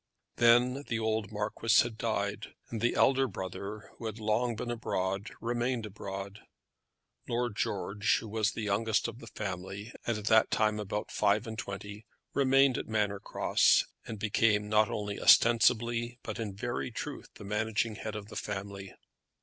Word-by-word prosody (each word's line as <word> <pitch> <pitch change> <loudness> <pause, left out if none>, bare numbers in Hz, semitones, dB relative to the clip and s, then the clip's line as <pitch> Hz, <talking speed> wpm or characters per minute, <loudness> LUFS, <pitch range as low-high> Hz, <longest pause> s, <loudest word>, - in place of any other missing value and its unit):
Then 120 +3 +4
the 115 - -1
old 110 -2 -1
Marquis 105 +2 +3
had 120 -2 -5
died, 105 -2 -2 0.2
and 115 -2 -3
the 120 - +2
elder 135 0 +4
brother, 100 +1 -6
who 115 - -4
had 110 0 -5
long 110 +2 +1
been 120 +2 -4
abroad, 95 -4 -2
remained 120 0 -1
abroad. 100 0 -7 0.9
Lord 120 -2 -1
George, 100 +1 0
who 115 - -6
was 110 -1 0
the 110 - -4
youngest 105 +2 +1
of 115 0 -8
the 115 - -11
family, 100 +1 -6
and 115 -2 +1
at 105 - -7
that 110 0 +5
time 105 0 +1
about 105 0 -4
five 105 0 +2
and 110 -1 -5
twenty, 100 +2 -7 0.3
remained 135 -1 +4
at - - -6
Manor 105 -2 0
Cross, - - +3 0.2
and 110 - -5
became 105 0 +2
not 110 0 +3
only 105 -1 -4
ostensibly 120 0 +4
but 110 - -5
in 105 -4 -4
very 120 +5 -3
truth 140 +4 -6
the - - -11
managing 110 +2 -1
head 110 -1 -5
of 105 -1 -7
the - - -10
family. 100 -1 -5
110 Hz, 165 wpm, -31 LUFS, 105-115 Hz, 0.9 s, that